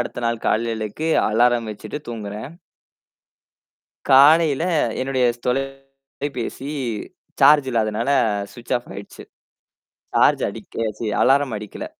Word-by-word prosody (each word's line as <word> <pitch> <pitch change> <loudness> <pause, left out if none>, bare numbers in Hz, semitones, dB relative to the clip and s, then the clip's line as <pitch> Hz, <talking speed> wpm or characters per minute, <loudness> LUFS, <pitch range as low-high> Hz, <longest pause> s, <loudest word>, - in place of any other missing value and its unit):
அடுத்த 120 - -4
நாள் 115 -1 -2
காலையிலக்கு 115 +6 -1 0.2
அலாரம் 120 +1 +2
வெச்சிட்டு 105 +7 -7
தூங்குறேன். 110 +1 -6 1.6
காலையில, 150 +2 +6 0.4
என்னுடைய 130 -1 0 0.2
தொலைபேசி 135 0 -5 0.7
சார்ஜ் 145 0 +6
இல்லாதனால 110 +2 0 0.4
ஸ்விச் 120 0 -6
ஆஃப் 120 - -14
ஆயிடுச்சு. 100 0 -10 0.9
சார்ஜ் - - +4
அடிக்க 115 -1 -5
சீ 115 - -3 0.2
அலாரம் 135 -3 +3
அடிக்கல. 105 - -8
125 Hz, 95 wpm, -21 LUFS, 115-135 Hz, 1.6 s, காலையில